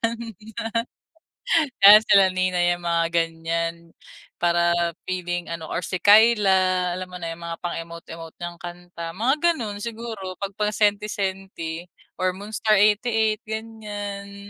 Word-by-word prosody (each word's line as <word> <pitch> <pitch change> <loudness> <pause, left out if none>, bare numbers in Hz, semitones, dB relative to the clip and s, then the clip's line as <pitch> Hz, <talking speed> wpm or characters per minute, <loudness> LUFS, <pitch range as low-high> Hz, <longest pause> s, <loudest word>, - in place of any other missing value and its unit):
'yan. 230 0 0 1.7
'Yan 205 +2 +11
sila 195 -1 +6
Nina, 185 -1 0
'yan 175 0 +1
mga 170 -1 +2
ganiyan 165 0 -2 0.5
para 170 0 +2
feeling 175 -1 -3
ano, 160 -1 -7
or 170 - -3
si 185 0 -3
Kyla, 190 -4 +4
alam 185 0 -5
mo 180 - -5
na 165 - -3
'yung 170 +1 -12
mga 170 0 -5
pang 175 - -3
emote-emote 165 -1 -9
niyang 175 0 -6
kanta, 175 -1 -8
mga 235 - +1 0.2
gano'n 215 -8 -5
siguro 225 -5 -6
'pag 200 0 -4
pang 210 0 0
senti-senti 195 -5 -2 0.3
or 185 0 0
Moonstar88, 215 +2 +2
ganiyan. 205 -2 -7
185 Hz, 130 wpm, -23 LUFS, 170-210 Hz, 1.7 s, Yan